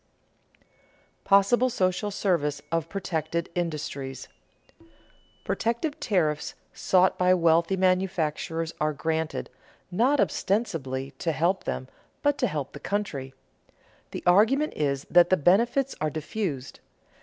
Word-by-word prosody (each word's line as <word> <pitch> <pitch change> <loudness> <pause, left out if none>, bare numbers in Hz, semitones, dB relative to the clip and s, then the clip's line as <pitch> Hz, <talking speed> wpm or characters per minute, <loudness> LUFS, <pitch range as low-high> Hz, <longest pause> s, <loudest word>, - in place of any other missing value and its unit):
[Sidenote: - - -37
Possible 215 +6 +4
social 190 -2 0
service 165 -8 0
of 165 -1 -1
protected 170 -3 -3
industries] 150 -6 -4 1.1
Protective 235 +7 -2
tariffs 155 -7 0 0.2
sought 185 0 +2
by 180 0 +5
wealthy 170 +2 +3
manufacturers 170 -3 0
are 155 0 +1
granted, 160 +1 -2 0.4
not 255 +10 +2
ostensibly 140 - -1
to 165 - 0
help 175 +5 0
them, 130 - -3 0.4
but 290 -1 +2
to 250 - +2
help 145 -8 -4
the - - -8
country. 140 -11 -3 0.7
The - - -7
argument 220 +12 +4
is 140 -2 -1
that 175 0 +5
the 185 - +4
benefits 235 - +2
are 155 - +1
diffused. 155 -3 -4
175 Hz, 115 wpm, -26 LUFS, 155-200 Hz, 1.1 s, by